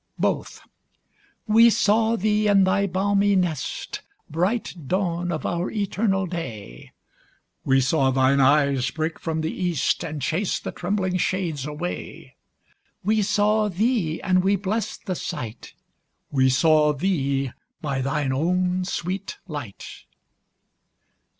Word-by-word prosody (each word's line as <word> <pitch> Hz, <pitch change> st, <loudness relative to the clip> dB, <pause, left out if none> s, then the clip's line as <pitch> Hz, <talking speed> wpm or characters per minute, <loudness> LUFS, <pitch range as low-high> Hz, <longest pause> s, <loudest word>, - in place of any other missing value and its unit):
Both. -, -, -2 dB, 0.8 s
We 230 Hz, +1 st, +6 dB
saw 220 Hz, +1 st, +3 dB
thee 210 Hz, 0 st, +1 dB
in 200 Hz, -1 st, +5 dB
thy 200 Hz, +1 st, +2 dB
balmy 200 Hz, +2 st, +2 dB
nest, 175 Hz, -6 st, -2 dB, 0.3 s
Bright 180 Hz, -, -2 dB
dawn 175 Hz, -1 st, -1 dB
of 155 Hz, -, -3 dB
our 175 Hz, +2 st, -1 dB
eternal 200 Hz, -2 st, 0 dB
day; 115 Hz, -, -7 dB, 0.7 s
We 135 Hz, 0 st, +4 dB
saw 135 Hz, +1 st, +2 dB
thine 130 Hz, +1 st, +3 dB
eyes 140 Hz, -1 st, +3 dB
break 160 Hz, 0 st, -3 dB
from 160 Hz, -2 st, -2 dB
the 155 Hz, -, -2 dB
east, 175 Hz, -3 st, 0 dB
And 155 Hz, -2 st, -4 dB
chase 165 Hz, +8 st, -1 dB
the -, -, -5 dB
trembling 185 Hz, 0 st, -1 dB
shades 170 Hz, -7 st, -1 dB
away: 150 Hz, -12 st, -6 dB, 0.7 s
We 215 Hz, +2 st, +2 dB
saw 210 Hz, +1 st, +2 dB
thee 195 Hz, -4 st, 0 dB
(and 185 Hz, -1 st, +3 dB
we 195 Hz, +1 st, +3 dB
blest 210 Hz, +2 st, -3 dB
the 185 Hz, -, -1 dB
sight) 120 Hz, -8 st, -6 dB, 0.6 s
We 130 Hz, -2 st, +3 dB
saw 150 Hz, +3 st, +4 dB
thee 140 Hz, -5 st, 0 dB, 0.3 s
by 140 Hz, -5 st, -2 dB
thine 135 Hz, 0 st, -1 dB
own 180 Hz, +5 st, 0 dB
sweet 185 Hz, +1 st, -4 dB
light. 145 Hz, -, -7 dB
175 Hz, 125 wpm, -24 LUFS, 145-200 Hz, 0.8 s, We